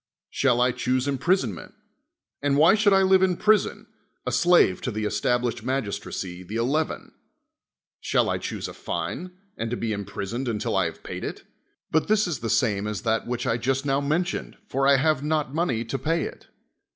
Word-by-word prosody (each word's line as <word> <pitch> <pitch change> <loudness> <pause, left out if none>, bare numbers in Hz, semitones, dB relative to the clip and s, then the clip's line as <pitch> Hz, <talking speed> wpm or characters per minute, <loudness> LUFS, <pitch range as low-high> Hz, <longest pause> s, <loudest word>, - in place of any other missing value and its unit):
Shall 125 -3 +2
I 125 +1 +4
choose 130 +2 -1
imprisonment? 140 - -1 0.7
And 140 0 +2
why 160 +6 +7
should 215 -1 +4
I 195 0 +5
live 190 0 +5
in 185 -2 +2
prison, 210 +2 +2 0.4
a - - -1
slave 175 - +4
to - - -2
the 110 -2 -3
established 120 +3 0
mag 130 +3 0
istracy, 90 -2 -5
the 100 +5 -7
Eleven? 140 +7 -1 0.9
Shall - - +1
1 - - -1
choose - - -4
a - - -8
fine, 180 0 -5 0.2
and 115 - -3
to 120 - -2
be 115 -2 -2
imprisoned 100 +5 -4
until 110 -3 -1
I - - +3
have - - -6
paid - - -6
it? - - -5 0.5
But 160 - +2
this 215 0 +3
is 170 -7 -3
the 115 - -3
same 105 -5 +1
as 105 +1 -4
that 115 -1 0
which 120 0 -2
I 115 - +1
just 135 +3 -1
now 135 0 +1
mentioned, 165 +6 -2
for 135 -4 +1
I 140 - +7
have 155 0 +2
not 150 -2 -1
money 140 -9 0
to 125 +4 -3
pay 165 0 0
it. - - -8
135 Hz, 190 wpm, -25 LUFS, 115-160 Hz, 0.9 s, why